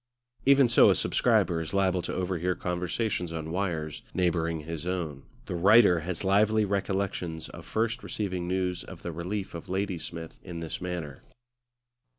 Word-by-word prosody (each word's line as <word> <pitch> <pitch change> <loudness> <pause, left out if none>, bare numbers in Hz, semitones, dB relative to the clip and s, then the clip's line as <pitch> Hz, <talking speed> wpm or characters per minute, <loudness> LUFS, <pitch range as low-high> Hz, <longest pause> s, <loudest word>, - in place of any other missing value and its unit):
Even 140 -2 +7
so 120 - +6
a - - +5
subscriber 85 -2 +2
is 80 +4 -5
liable 95 -2 +2
to - - -4
overhear 90 -1 -1
conversations 90 +1 -2
on 80 -1 -4
wires 85 -5 -2
neighbouring 85 -3 +1
his 80 +2 -6
own; 85 -7 -3 0.2
the 95 - -5
writer 95 +1 +6
has 85 +2 -4
lively 105 +2 +3
recollections 95 -4 -2
of - - -11
first 115 +3 0
receiving 95 -4 -3
news 90 -1 -1
of - - -11
the 85 - -3
relief 95 +5 -4
of 85 +2 -8
Ladysmith 90 -4 -4
in 85 -2 -6
this 85 +1 -5
manner. 85 -6 -5
90 Hz, 155 wpm, -28 LUFS, 85-100 Hz, 0.2 s, Even